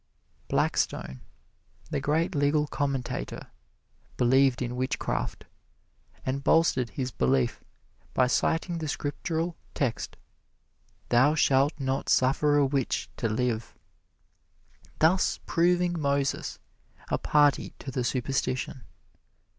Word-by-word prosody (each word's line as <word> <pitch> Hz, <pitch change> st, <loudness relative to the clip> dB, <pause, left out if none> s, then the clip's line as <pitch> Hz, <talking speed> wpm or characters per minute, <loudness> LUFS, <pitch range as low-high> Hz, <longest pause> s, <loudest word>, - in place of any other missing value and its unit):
Blackstone, 65 Hz, -1 st, -1 dB, 0.7 s
the 145 Hz, -, 0 dB
great 150 Hz, +5 st, 0 dB
legal 145 Hz, +1 st, +2 dB
commentator, 140 Hz, -3 st, -3 dB, 0.7 s
believed 130 Hz, +1 st, +3 dB
in 120 Hz, 0 st, -4 dB
witchcraft, 130 Hz, +1 st, -2 dB, 0.8 s
and 135 Hz, +1 st, -2 dB
bolstered 135 Hz, -8 st, +3 dB
his 130 Hz, +1 st, -4 dB
belief 130 Hz, -2 st, +1 dB, 0.5 s
by 130 Hz, -, +4 dB
citing 165 Hz, +6 st, 0 dB
the 155 Hz, -, -3 dB
Scriptural 160 Hz, +3 st, -2 dB, 0.2 s
text, 125 Hz, -5 st, -2 dB, 0.9 s
"Thou 130 Hz, +6 st, +4 dB
shalt 140 Hz, +1 st, +3 dB
not 135 Hz, 0 st, -2 dB
suffer 145 Hz, +3 st, +3 dB
a 145 Hz, -, +4 dB
witch 135 Hz, -2 st, -1 dB
to 115 Hz, -, -1 dB
live" 115 Hz, 0 st, -2 dB, 1.2 s
thus 175 Hz, +4 st, +3 dB
proving 175 Hz, 0 st, +2 dB
Moses 140 Hz, -1 st, 0 dB, 0.5 s
a -, -, 0 dB
party 145 Hz, -2 st, +2 dB
to 135 Hz, -, -7 dB
the 125 Hz, -1 st, -1 dB
superstition. 130 Hz, 0 st, -2 dB
140 Hz, 100 wpm, -28 LUFS, 130-150 Hz, 1.2 s, by